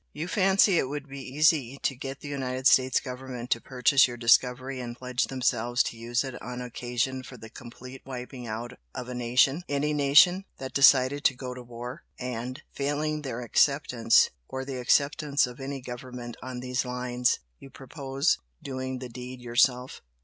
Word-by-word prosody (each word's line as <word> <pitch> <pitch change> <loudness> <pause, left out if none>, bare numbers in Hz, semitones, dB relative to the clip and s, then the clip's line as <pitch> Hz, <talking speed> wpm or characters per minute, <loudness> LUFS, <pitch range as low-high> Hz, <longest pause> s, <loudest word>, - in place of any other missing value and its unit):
You 155 +3 -4
fancy 195 -1 +4
it 130 - -1
would 145 0 -5
be 140 0 -8
easy 140 -1 +2
to 135 - +1
get 135 +2 -7
the - - -8
United 130 -2 -3
States 130 -1 +5
Government 125 -2 -7
to 115 - +2
purchase 130 +1 +4
your 120 -1 -7
discovery 125 +2 +2
and 120 -1 -6
pledge 125 0 -1
themselves 120 -2 +1
to - - -5
use 120 +3 -1
it 130 -2 -7
on 125 0 -6
occasion 125 +1 -2
for 130 0 -11
the 110 -1 -12
complete 125 +2 -11
wiping 125 -1 -7
out 115 +3 -5 0.2
of 125 -1 -6
a - - -4
nation, 125 +5 +2
any 145 +1 0
nation 150 +7 +5
that 130 0 -7
decided 140 0 +5
to 130 - +4
go 125 0 -6
to 125 - -9
war, 120 +1 -8 0.2
and, 125 0 -5
failing 150 +2 -2
their 125 -4 -5
acceptance, 125 -1 +3 0.2
or 130 0 -5
the 135 -2 -5
acceptance 145 +3 +2
of 125 +1 -10
any 135 0 -5
government 120 -1 -7
on 125 0 -6
these 125 0 -1
lines, 125 -1 0 0.2
you 135 - -12
purpose 135 +3 -1 0.2
doing 130 -1 -4
the 125 0 -7
deed 125 +1 -8
yourself. 125 +1 +1
130 Hz, 175 wpm, -27 LUFS, 125-140 Hz, 0.2 s, States